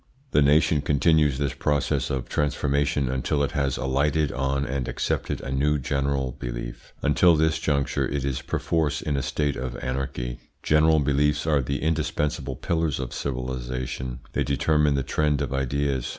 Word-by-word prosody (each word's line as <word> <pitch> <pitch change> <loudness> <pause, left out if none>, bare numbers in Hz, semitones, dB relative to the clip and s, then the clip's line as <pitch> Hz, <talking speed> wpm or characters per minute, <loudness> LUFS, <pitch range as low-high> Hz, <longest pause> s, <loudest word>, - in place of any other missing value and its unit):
The 75 - +4
nation 75 +1 +4
continues 75 -1 +3
this 70 -2 -1
process 75 -2 0
of 65 -2 -2
transformation 70 -1 0
until 65 +3 0
it 70 - -1
has 70 -2 0
alighted 70 +3 +1
on 70 +1 -1
and 65 0 -2
accepted - - -2
a 65 - -5
new 75 +3 +2
general 70 -1 -1
belief: - - -6
until 85 +4 +5
this 80 0 +2
juncture 70 -3 0
it 70 0 -2
is 70 -1 -2
perforce 80 +3 -1
in 75 - -1
a 70 - 0
state 70 +2 -1
of - - -4
anarchy. 65 -1 -3 0.2
General 75 0 +4
beliefs 75 +2 +1
are 75 -3 +3
the 70 +4 -3
indispensable 75 -3 -1
pillars 80 +1 -1
of 65 -2 -4
civilisations; 65 -1 -4 0.2
they - - +1
determine 75 +1 +2
the 70 - 0
trend 75 +1 +1
of - - -2
ideas. 70 -1 -1
70 Hz, 160 wpm, -25 LUFS, 65-75 Hz, 0.2 s, until